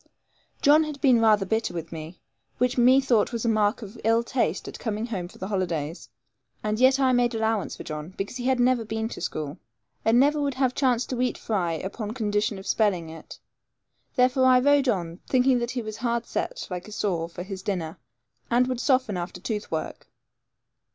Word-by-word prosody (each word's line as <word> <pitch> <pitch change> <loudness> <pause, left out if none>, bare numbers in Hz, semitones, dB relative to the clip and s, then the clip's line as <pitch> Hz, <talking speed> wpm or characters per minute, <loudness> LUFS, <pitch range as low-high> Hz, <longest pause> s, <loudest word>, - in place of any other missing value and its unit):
John 300 +2 +6
had 300 -2 -6
been 255 -5 +4
rather 215 -3 +4
bitter 220 -1 -1
with 165 -1 -5
me, 160 +2 -8 0.4
which 250 +1 +1
methought 250 -2 +4
was 235 -1 -3
a - - +1
mark 215 +1 +1
of 210 +2 -10
ill 225 +2 +3
taste 235 -8 -1
at - - -8
coming 220 -1 -2
home 195 -7 -4
for - - -16
the 190 - -5
holidays; 170 -5 -3 0.5
and 215 +1 -1
yet 260 +1 +5
I 260 -1 +4
made 245 -1 +2
allowance 220 -2 -1
for - - -7
John, 155 +4 -7
because 200 +5 -4
he 245 - -5
had 260 -1 +2
never 245 -1 +3
been 220 0 -3
at 225 - -6
school, 150 -2 -4 0.4
and 225 +2 +4
never 295 +2 +3
would 280 -2 -1
have 260 -1 +1
chance 255 -3 +1
to 250 -1 -3
eat 250 - 0
fry 185 -7 -1
upon 205 +6 -5
condition 210 -2 0
of 190 - -10
spelling 185 -7 +1
it; 165 - -11 0.8
therefore 255 0 +3
I 255 -1 +6
rode 280 0 +4
on, 175 -5 -2
thinking 255 -1 +3
that 235 0 -2
he 255 -2 -3
was 215 0 -6
hard 235 -1 -1
set, - - -4
like 180 +1 -5
a - - -11
saw, 180 -6 -1
for 175 +1 -7
his 190 0 -7
dinner, 175 -4 -3 0.5
and 245 +1 +4
would 255 -1 -2
soften 255 -7 +1
after 175 +1 -5
tooth 210 +2 -4
work. 160 - -4
225 Hz, 200 wpm, -26 LUFS, 190-250 Hz, 0.8 s, John